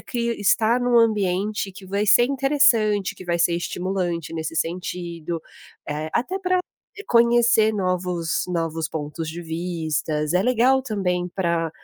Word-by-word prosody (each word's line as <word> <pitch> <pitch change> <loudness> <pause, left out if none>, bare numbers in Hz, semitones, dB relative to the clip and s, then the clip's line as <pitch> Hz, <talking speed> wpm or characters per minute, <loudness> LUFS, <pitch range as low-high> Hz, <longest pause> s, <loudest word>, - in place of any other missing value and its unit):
cria 235 -1 -3
estar 225 +4 +3
em 245 - -1
um 245 -1 +3
ambiente 205 -2 +1
que 190 +1 -12
vai 200 +3 -1
ser 240 +4 +6
interessante, 250 -7 +2
que - - -10
vai 170 -1 -1
ser 170 0 +3
estimulante 175 -2 -3
nesse 160 0 -4
sentido, 170 -1 -4 0.5
eh, 150 +1 -3
até 370 +10 -1
para 365 -1 +1 0.5
conhecer 235 -2 +4
novos 180 -3 -1
novos 165 -2 -2
pontos 155 +1 -5
de 170 +2 -6
vistas, 160 -2 -2
é 180 +2 +3
legal 255 +2 +3
também 180 -7 -1
para 170 -3 -1
185 Hz, 140 wpm, -23 LUFS, 165-230 Hz, 0.5 s, ser